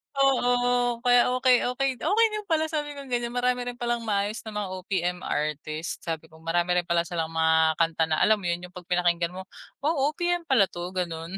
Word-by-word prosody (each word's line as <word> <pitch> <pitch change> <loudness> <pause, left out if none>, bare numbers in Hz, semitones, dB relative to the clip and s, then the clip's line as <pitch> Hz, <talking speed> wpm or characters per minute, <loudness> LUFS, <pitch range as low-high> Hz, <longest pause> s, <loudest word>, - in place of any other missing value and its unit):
Oo. 245 -2 +2
Kaya, 245 -1 +5
"Okey, 255 -1 +4
okey, 265 -1 -1
okey 415 +8 +3
din 425 -1 -4
pala," 320 -2 +2
sabi 295 -2 -3
kong 275 -2 -10
ganiyan. 240 -1 -1
"Marami 245 0 0
rin 245 - -5
palang 240 -1 -1
maayos 205 +1 0
na 220 - -6
mga 210 -2 -2
OPM 180 -1 -2
artist," 155 +2 -3
sabi 160 -1 -5
ko. 160 - -16
Marami 175 +2 +1
rin 175 - -5
pala 170 0 +2
silang 165 -2 -3
mga 160 0 +3
kanta 165 0 +1
na 155 -1 0
alam 215 0 +5
mo 190 - -9
'yun, 175 +1 -2
'yung 180 - -24
'pag 180 -1 -11
pinakinggan 175 -1 +1
mo, 190 - -6 0.4
"Wow, 290 -2 +2
OPM 350 0 -1
pala 240 -8 +5
'to," 175 +1 -5
ganun. 170 0 -4
205 Hz, 205 wpm, -26 LUFS, 170-250 Hz, 0.4 s, Kaya